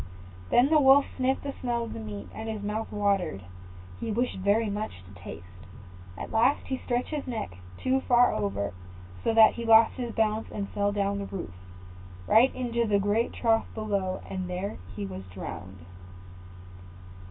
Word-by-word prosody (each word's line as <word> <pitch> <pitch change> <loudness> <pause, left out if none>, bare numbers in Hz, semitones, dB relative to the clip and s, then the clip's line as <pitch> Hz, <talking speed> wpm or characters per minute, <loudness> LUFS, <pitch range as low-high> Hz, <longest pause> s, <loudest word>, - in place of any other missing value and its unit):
Then 250 +3 +5
the 310 - +6
Wolf 275 0 +7
sniffed 265 0 0
the 280 -1 -4
smell 240 -2 -1
of 230 - -6
the - - -6
meat, 105 -2 -7
and 220 0 -6
his 215 -2 -4
mouth 215 +2 -3
watered, 200 - 0
and 90 0 -16
he 225 - -3
wished 240 +2 -1
very 205 +4 +2
much 205 - -4
to 95 +1 -15
taste. 90 0 -8 0.7
At - - -6
last 230 +6 +3
he 260 -1 -3
stretched 245 0 -2
his 300 -3 -3
neck 230 - -3 0.3
too 265 +1 +1
far 245 0 +5
over, 100 -1 -2 0.5
so - - +2
that 220 -1 +8
he 235 - -5
lost 225 0 +6
his 245 -2 -3
balance, 220 0 +1
and 200 -1 -3
fell 205 0 0
down 200 0 0
from 200 - -4
the 195 - -5
roof, 90 - -11 0.7
right 235 - +5
into 235 -2 -1
the 205 -1 +3
great 205 +4 +1
trough 225 -2 +1
below, 200 -4 -2
and 185 -1 -4
there 185 +3 -3 0.2
he 100 0 -4
was 95 -1 -6
drowned. 90 -1 -8
210 Hz, 180 wpm, -28 LUFS, -, 0.7 s, that